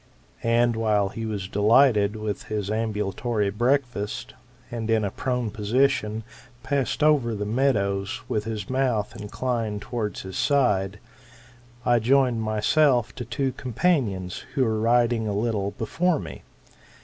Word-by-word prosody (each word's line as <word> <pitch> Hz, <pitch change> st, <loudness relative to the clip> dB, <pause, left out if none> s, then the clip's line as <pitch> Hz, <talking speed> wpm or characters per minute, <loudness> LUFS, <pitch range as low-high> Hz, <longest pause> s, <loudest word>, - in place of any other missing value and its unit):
And 115 Hz, 0 st, +2 dB
while 105 Hz, -3 st, +1 dB
he 115 Hz, +2 st, -5 dB
was 100 Hz, -3 st, -3 dB
delighted 105 Hz, +1 st, +4 dB
with 110 Hz, -1 st, -4 dB
his 105 Hz, -2 st, -3 dB
ami^ulatory 105 Hz, -1 st, -1 dB
breakfast, 120 Hz, -3 st, -1 dB, 0.4 s
and 115 Hz, -2 st, -4 dB
in 110 Hz, -2 st, +2 dB
a 100 Hz, -, -2 dB
prone 125 Hz, -4 st, -2 dB
position 110 Hz, 0 st, +1 dB, 0.4 s
passed 140 Hz, +2 st, -1 dB
over 140 Hz, -7 st, +3 dB
the 105 Hz, 0 st, -3 dB
meadows 100 Hz, -5 st, 0 dB
with 105 Hz, -1 st, -1 dB
his 110 Hz, -2 st, -4 dB
mouth 130 Hz, -5 st, 0 dB
inclined 110 Hz, 0 st, -3 dB
towards 110 Hz, -4 st, -4 dB
his 95 Hz, -1 st, -6 dB
side, 105 Hz, -9 st, +2 dB, 0.9 s
I 120 Hz, -1 st, +4 dB
joined 125 Hz, 0 st, +3 dB
myself 115 Hz, +4 st, +2 dB
to 120 Hz, -, -6 dB
two 135 Hz, +2 st, -1 dB
companions, 120 Hz, -, -1 dB
who 130 Hz, -, +3 dB
were 110 Hz, -1 st, 0 dB
riding 115 Hz, 0 st, +2 dB
a 105 Hz, -, -1 dB
little 105 Hz, -1 st, 0 dB
before 165 Hz, +10 st, +1 dB
me. -, -, -8 dB
115 Hz, 135 wpm, -25 LUFS, 105-125 Hz, 0.9 s, delighted